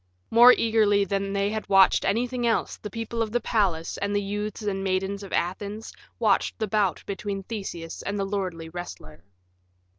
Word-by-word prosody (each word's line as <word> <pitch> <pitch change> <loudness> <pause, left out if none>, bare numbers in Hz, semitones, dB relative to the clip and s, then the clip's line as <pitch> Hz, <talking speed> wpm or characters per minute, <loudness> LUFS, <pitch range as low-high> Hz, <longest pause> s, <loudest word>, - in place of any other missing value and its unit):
More 240 +2 +9
eagerly 215 -4 +3
than 195 0 -2
they 200 +1 0
had 220 0 -4
watched 195 -1 +5
anything 245 +3 0
else 230 - 0
the 210 - -7
people 230 +2 -4
of 220 -2 -1
the 240 - +1
palace 195 -8 0
and 200 0 -1
the 205 - +2
youths 210 +2 -4
and 195 -2 -2
maidens 195 +1 -1
of 195 - -9
Athens 205 +5 -3 0.2
watched - - +1
the 220 - -1
bout 205 -2 0
between 200 0 -4
Theseus 185 -6 -6
and 200 +1 -3
the 195 - -1
lordly 185 -5 -3
wrestler. 125 - -9
200 Hz, 175 wpm, -26 LUFS, 195-220 Hz, 0.2 s, More